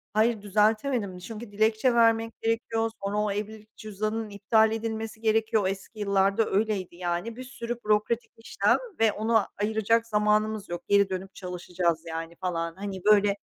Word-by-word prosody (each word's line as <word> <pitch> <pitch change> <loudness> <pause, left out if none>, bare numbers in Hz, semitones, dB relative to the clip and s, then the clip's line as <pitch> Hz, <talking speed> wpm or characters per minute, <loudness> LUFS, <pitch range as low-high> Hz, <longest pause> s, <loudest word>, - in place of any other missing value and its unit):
Hayır, 220 -1 +2
düzeltemedim 210 0 +1
çünkü 215 +4 -8
dilekçe 220 +4 +2
vermek 230 -1 +2
gerekiyor, 225 0 0
sonra 200 +1 -1
o 210 -1 +1
evlilik 215 +1 -6
cüzdanının 215 +1 -3
iptal 220 +2 +3
edilmesi 220 0 -4
gerekiyor. 220 -2 +2
Eski 195 +3 -6
yıllarda 200 +1 +2
öyleydi 200 -4 -1
yani. 175 +5 -3
Bir 255 - -7
sürü 240 -2 -5
bürokratik 215 +2 +1
işlem 225 - +1 0.2
ve 225 -2 +4
onu 220 +1 +2 0.2
ayıracak 220 +2 +1
zamanımız 210 -1 +1
yok. 175 0 -4
Geri 200 -1 +4
dönüp 190 +1 -5
çalışacağız 180 -2 -2
yani 165 +1 -5
falan. 170 -2 -3
Hani, 195 -1 -6
böyle, 205 -1 +5
215 Hz, 145 wpm, -27 LUFS, 195-225 Hz, 0.2 s, böyle